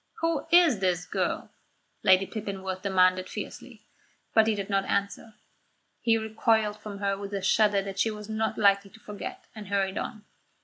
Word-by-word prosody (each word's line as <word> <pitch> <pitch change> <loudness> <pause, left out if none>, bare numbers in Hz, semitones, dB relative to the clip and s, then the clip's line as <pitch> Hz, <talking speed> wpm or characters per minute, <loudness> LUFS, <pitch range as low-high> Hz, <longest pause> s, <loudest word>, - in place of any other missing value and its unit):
"Who 330 0 0
is 335 - +6
this 180 -2 0
girl?" - - -2 0.5
Lady 190 +1 +5
Pippinworth 190 -3 -5
demanded 185 -1 +2
fiercely; - - -8 0.5
but 220 -1 +5
he 220 - +2
did 200 -1 -4
not 195 -1 0
answer. 200 +2 -2 0.6
He 230 -1 +3
recoiled 220 -1 +1
from 210 -1 -8
her 200 0 0
with 200 0 -6
a 195 - -2
shudder 205 0 +3
that 195 0 -6
she 225 - +3
was 210 -1 -7
not 220 0 -2
likely 200 -1 +3
to 220 - -17
forget, 295 - -8
and 215 -2 -9
hurried 195 0 0
on. 215 -3 -6
205 Hz, 170 wpm, -27 LUFS, 195-220 Hz, 0.6 s, is